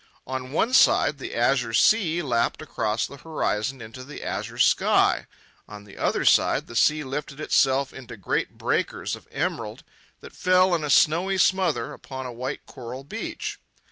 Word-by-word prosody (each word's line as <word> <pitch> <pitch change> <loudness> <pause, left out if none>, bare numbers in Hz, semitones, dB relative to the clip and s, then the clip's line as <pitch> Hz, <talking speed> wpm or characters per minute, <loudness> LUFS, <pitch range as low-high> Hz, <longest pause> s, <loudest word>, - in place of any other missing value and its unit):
On 130 0 -5
one 225 - 0
side 150 - +4
the - - -6
azure 120 -1 +1
sea 175 - +3
lapped 120 -4 0
across 110 -7 -2
the 140 - -10
horizon 135 -5 -2
into 115 +4 -10
the 145 +3 -9
azure - - -4
sky; - - +3 0.4
on 105 -1 -10
the 100 -1 -15
other - - -1
side - - +4
the 115 - -11
sea 150 +5 +3
lifted 140 +1 -5
itself 135 -2 +2
into 125 -3 -10
great 95 - -2
breakers - - -1
of - - -16
emerald - - -3 0.4
that - - -12
fell 185 0 +3
in 165 -3 0
a 150 - -3
snowy 170 +7 +3
smother 185 -8 +1
upon 130 -2 -8
a 125 - -6
white 130 +4 -5
coral 125 +1 -9
beach. 140 - -6
135 Hz, 165 wpm, -25 LUFS, 120-155 Hz, 0.4 s, side